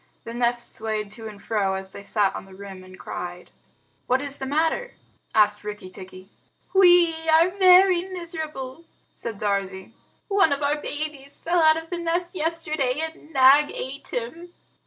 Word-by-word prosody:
The 230 - -7
nest 240 0 0
swayed 215 -2 -3
to 225 +1 -8
and 210 -2 -10
fro, 200 -2 -1
as 190 0 -5
they - - -9
sat 200 -1 0
on - - -7
the 190 -1 -15
rim 195 -1 -10
and 185 0 -14
cried. 180 0 -7 0.6
"What 255 +1 +2
is 285 0 -2
the 265 - -4
matter?" 325 - 0 0.4
asked 210 -1 +3
Rikki 210 -3 -7
tikki. 185 +1 -12 0.4
"We 350 -4 +5
are 325 +3 +5
very 370 -1 +6
miserable," 320 -5 -6 0.3
said 230 -3 -6
Darzee. 195 0 -2 0.3
"One 395 -7 +3
of 280 +1 -3
our 295 +1 0
babies 290 -2 -5
fell 345 0 +2
out 315 0 +5
of 325 +1 -8
the 350 - -2
nest 345 +1 -1
yesterday 310 -5 -1
and 320 -1 -6
Nag 275 +1 +6
ate 270 +2 -6
him." 330 +9 -6
275 Hz, 165 wpm, -24 LUFS, 210-330 Hz, 0.6 s, very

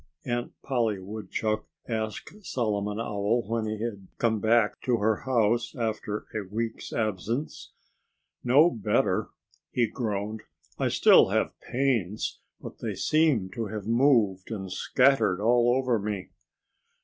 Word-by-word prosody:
Aunt 120 0 -2
Polly 115 -6 0
Woodchuck 110 +2 -3 0.2
asked 110 - -4
Solomon 105 - -1
Owl, 110 +1 0
when 115 0 -1
he 110 0 -3
had 100 -5 -5
come 110 -2 +1
back 110 0 +2
to 125 -2 +1
her 110 0 +2
house 120 -2 +1
after 110 -3 -3
a 110 - -2
week's 115 +2 -4
absence. 110 - -3 0.7
"No 145 +8 +5
better!" 110 -4 0 0.4
he 120 - +2
groaned. 105 -2 -3 0.4
"I - - +2
still - - +6
have - - 0
pains. 120 -7 -1 0.2
But - - -10
they - - -3
seem 150 -12 +2
to 115 +1 -3
have 105 -1 -6
moved 115 -6 +3
and 95 -5 -5
scattered 115 -3 +3
all 120 +2 +4
over 130 -3 +1
me." 100 -2 -4
110 Hz, 130 wpm, -27 LUFS, 105-120 Hz, 0.7 s, still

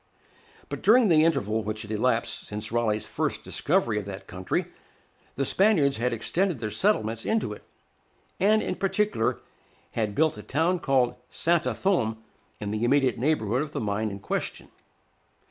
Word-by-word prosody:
But - - -6
during 230 0 +5
the 155 -2 +5
interval 110 -9 +1
which 110 +1 -4
had 105 - -8
elapsed 115 +2 0
since 105 0 -5
Raleigh's 110 -2 0
first - - -2
discovery 110 -3 0
of 100 - -7
that 100 -1 -7
country, 90 -1 -2 0.7
the 135 - 0
Spaniards 165 -7 +3
had 125 +2 0
extended 170 - 0
their 110 -2 -3
settlements 115 - +1
into 220 - 0
it, - - -12 0.8
and 215 +3 +4
in - - -1
particular 200 - 0 0.5
had 105 -3 -2
built 155 -6 +2
a - - -6
town 165 - 0
called 130 -5 +1
Santa 170 0 +1
Thome 125 - +1 0.4
in 105 -1 -4
the 110 +1 -2
immediate 130 0 +2
neighborhood 125 -4 +1
of 150 0 -5
the - - -2
mine 105 +1 -1
in 100 0 -7
question. 100 - -4
120 Hz, 160 wpm, -26 LUFS, 110-165 Hz, 0.8 s, during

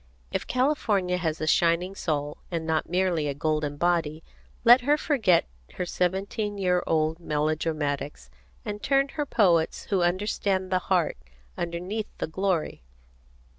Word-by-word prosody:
If - - -3
California 215 -9 +1
has 165 -3 -2
a 155 - -2
shining 170 +3 +2
soul, 150 -5 -2
and 165 -2 -3
not 160 -1 -1
merely 175 -4 +1
a 140 - -2
golden 150 -1 -1
body, 165 -2 0 0.4
let 240 +2 +8
her 290 +4 +3
forget 230 - +2 0.3
her 180 - -2
seventeen 195 +4 -1
year 180 -2 +2
old 160 0 +1
melodramatics, 150 - -2 0.3
and 205 0 -5
turn 275 0 +2
to - - -14
her 295 -2 -2
poets 175 -9 +2
who 195 -2 +2
understand 190 +1 0
the 185 - +3
heart 180 -3 +2 0.4
underneath 180 +6 -3
the - - -2
glory. 185 0 -1
175 Hz, 140 wpm, -26 LUFS, 155-200 Hz, 0.4 s, let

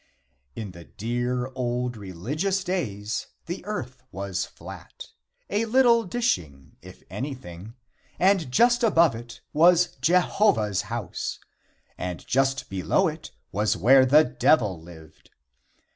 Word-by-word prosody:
V. - - -5
In 100 - -7
the 85 -1 -12
dear 120 - -3
old 125 -1 -2
religious 135 - -3
days 110 - -3 0.2
the - - -5
earth - - -5
was 95 0 -3
flat - - -11 0.4
a 210 +3 0
little 235 -1 +4
dishing, 90 - -2
if - - -14
anything 115 - -7 0.4
and 185 -7 +3
just 240 - +4
above 170 - +4
it 115 +1 -10
was 175 +3 +4
Jehovah's 160 - +2
house, 115 -6 -4 0.6
and 90 -1 -5
just 135 +1 +1
below 95 -4 +1
it - - -6 0.2
was 105 +1 0
where 130 +8 +6
the 145 +4 +6
Devil 125 - +2
lived. 80 -2 -15
125 Hz, 120 wpm, -25 LUFS, -, 0.6 s, where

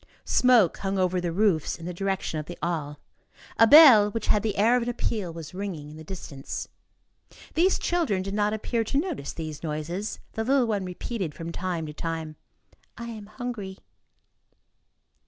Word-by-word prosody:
Smoke 245 -8 +4
hung 195 0 -2
over 185 -1 +1
the 175 -1 -2
roofs 180 -4 +1
in 165 - -10
the 180 - -4
direction 190 -3 -2
of 150 - -7
the 175 - -8
Halles. 155 -4 -2 0.6
A 225 - +8
bell, 255 -8 +9
which 225 0 -4
had 210 - +3
the 210 -2 -2
air 225 +4 +4
of 250 - +2
an 235 - -2
appeal, 215 -6 -2
was 165 -1 -9
ringing 180 -7 -5
in - - -11
the 160 - -10
distance. 155 -5 -7 0.9
These 365 +4 +3
children 315 - 0
did 195 +1 -5
not 210 0 +1
appear 225 +2 -1
to 225 - -2
notice 305 - -2
these 155 -3 -6
noises. 165 +6 -4 0.2
The 220 - -2
little 265 +1 +3
one 205 -4 -1
repeated 180 -2 -4
from 165 0 -6
time 175 -2 -3
to 150 - -7
time: 160 -1 -4 0.6
"I 235 0 -6
am 215 -3 -8
hungry." 215 -4 -6
195 Hz, 175 wpm, -26 LUFS, 165-225 Hz, 0.9 s, bell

